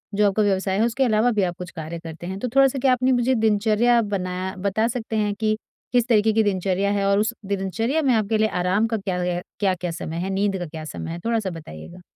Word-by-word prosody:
जो 210 0 +4
आपका 210 +2 +2
व्यवसाय 190 -1 +1
है 220 - +3
उसके 240 +3 0
अलावा 230 0 +3
भी 205 -3 +1
आप 175 -1 -1
कुछ 180 -1 -7
कार्य 165 +1 -6
करते 165 +1 -8
हैं 190 +1 -5
तो 250 - -2
थोड़ा-सा 270 0 +4
क्या 255 0 +4
अपनी 255 +1 +2
मुझे 250 +1 +2
दिनचर्या 220 +2 +3
बना 185 0 -2
बता 220 +4 +1
सकते 230 -2 -4
हैं 210 -1 +1
कि 215 0 0 0.4
किस 245 -1 +3
तरीके 220 -2 +3
की 220 0 +3
दिनचर्या 195 0 0
है 200 -1 0
और 200 0 +3
उस 220 +3 +1
दिनचर्या 200 - -1
में 270 -4 +3
आपके 215 0 +1
लिए 220 - +3 0.2
आराम 200 +5 +2
का 225 - -1
क्या 190 -3 -3 0.4
क्या-क्या 185 -3 0
समय 165 -1 -5
है, 185 +3 -2
नींद 195 0 0
का 175 - -4
क्या 155 0 -8
समय 165 +1 -6
है 170 - -5
थोड़ा-सा 225 -4 0
बताइएगा। 165 - -10
205 Hz, 230 wpm, -23 LUFS, 185-225 Hz, 0.4 s, जो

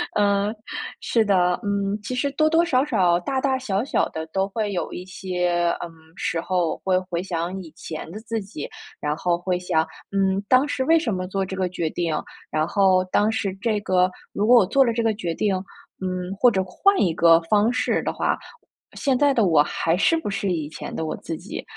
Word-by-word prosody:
嗯， 205 +1 +2 0.5
是 230 - +2
的， 180 -3 +2
嗯， 200 0 -1
其 255 - -4
实 255 +3 0
多 310 +3 +2
多 325 +1 +4
少 265 -6 +2
少、 180 -10 +2
大 265 +9 -2
大 265 -1 +1
小 210 -5 -1
小 275 - +1
的 160 0 -5
都 190 +4 -1
会 210 0 -2
有 180 - -3
一 180 - -6
些， 180 -2 -1
嗯， 175 - -5 0.3
时 170 - -2
候 175 -2 0
会 185 -1 +2
回 180 -1 -4
想 180 0 -3
以 160 - -12
前 160 -1 -7
的 210 - -7
自 225 0 -3
己， 190 -7 -7 0.3
然 150 0 -1
后 175 -1 +1
会 180 +1 -1
想， 165 -3 0 0.2
嗯， 195 0 +1
当 260 +3 +5
时 265 - -1
为 325 +4 +4
什 270 -9 -1
么 185 0 -2
做 195 +1 -1
这 190 - -6
个 185 -1 0
决 170 -2 -2
定， 170 0 -2 0.4
然 155 +1 +1
后 190 -2 +3
当 205 +4 +2
时 220 -4 -2
这 220 -2 +1
个， 185 -2 +2 0.2
如 205 - 0
果 245 +2 +7
我 200 - +4
做 270 +5 +4
了 235 - +2
这 230 - 0
个 225 -1 +2
决 175 -6 -3
定， 200 +3 0 0.5
嗯， 185 0 -3
或 245 +1 +6
者 190 - +1
换 390 - +2
一 175 -4 +2
个 165 0 +6
方 210 +6 +3
式 250 - 0
的 - - -1
话， - - 0 0.2
我 - - -22
现 270 -3 +1
在 285 +1 +4
的 230 -5 +3
我 160 -5 +5
还 165 +2 0
是 330 - +3
不 320 - -3
是 200 -1 -1
以 160 -4 -2
前 155 - -8
的 160 - -3
我 155 - -3
自 165 - -5
己， 185 +5 -7
190 Hz, 235 characters per minute, -23 LUFS, 175-225 Hz, 0.5 s, 果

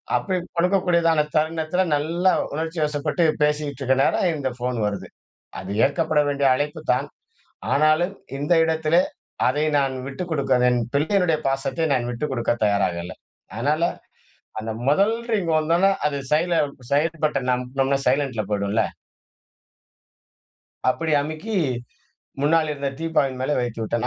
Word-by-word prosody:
அப்பிடி 185 -2 0 0.2
கொடுக்கக்கூடியதான 170 -3 +3
தருணத்தில 160 +3 +1
நல்லா 170 +5 +1 0.2
உணர்ச்சிவசப்பட்டு 155 0 -1 0.2
பேசிக்கிட்டு 150 -2 -1
இருக்க 130 0 +3
நேரம், 180 - +2
இந்த 140 -3 -2
ஃபோனு 125 -1 -2
வருது. 100 -1 -4 0.5
அது 95 - -7
ஏற்கப்பட 155 +2 +1
வேண்டிய 140 -1 +1
அழைப்பு 150 +3 -3
தான். 135 +3 -1 0.7
ஆனாலும், 155 +6 +3 0.2
இந்த 145 +4 0
இடத்திலே 160 +1 +2 0.5
அதை 145 +4 +1
நான் 135 -1 0
விட்டு 135 +6 -5
கொடுக்க 140 -4 0
வேண் - - +4
என் - - 0
பிள்ளையினுடைய 165 +2 +2
பாசத்தை 135 +4 -1
நான் 120 -2 -1
விட்டு 120 +5 -4
கொடுக்க 120 -2 -1
தயாராக 100 -4 +1
இல்ல. 90 +2 -7 0.4
அதனால 145 +8 +1 0.8
அந்த 110 +1 -4 0.2
முதல் 200 +10 +3 0.2
ரிங் 190 -6 0
வந்தோன, 165 +4 +2 0.2
அது 145 -1 -2
சைல 170 +2 +2 0.3
சைடு 160 +4 +1
பட்டன 135 -4 +1
அமுக்குனோம்ன்னா, 135 +2 0
சைலன்ட்ல 130 -4 +1
போயிடும்ல. 100 +2 +1 2.1
அப்பிடி 160 +4 0
அமுக்கி 155 +9 -4 0.9
முன்னால 155 +2 +2
இருந்த 140 -1 -3
டீப்பாயின் 150 -5 0
மேலே 135 +3 0
வைத்து 120 -2 -3
விட்டேன். 115 +2 -1
150 Hz, 130 wpm, -23 LUFS, 130-165 Hz, 2.1 s, வேண்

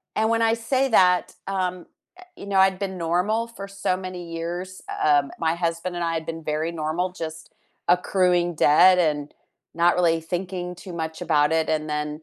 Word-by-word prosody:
a - - 0
and 220 - +2
when 230 0 +1
I 225 0 +3
say 260 +4 0
that, 180 -4 +4
um, 185 -2 -2 0.3
eh - - -12
you - - -10
know, 195 -1 0
I'd 190 -1 +4
been 190 -2 -4
normal 180 +7 0
for 200 -4 -9
so 195 -2 -1
many 180 -2 -7
years, 175 +3 -5
u - - -4 0.2
um, 145 -1 +3
my 165 -1 +1
husband 170 +1 -2
and 175 - -2
I 165 - -1
had 160 -1 -3
been 165 0 -6
very 155 +2 -2
normal, 165 +3 -2
just 160 -3 -7 0.4
accruing 180 -1 +2
debt 180 +5 +6
and 150 -3 0 0.4
not 170 +1 +3
really 170 -2 +2
thinking 180 +1 -4
too 180 +1 -10
much 160 0 -5
about 150 -3 +2
it, 160 0 +1
and 155 -1 -1
then 150 0 -2
175 Hz, 195 wpm, -24 LUFS, 160-185 Hz, 0.4 s, debt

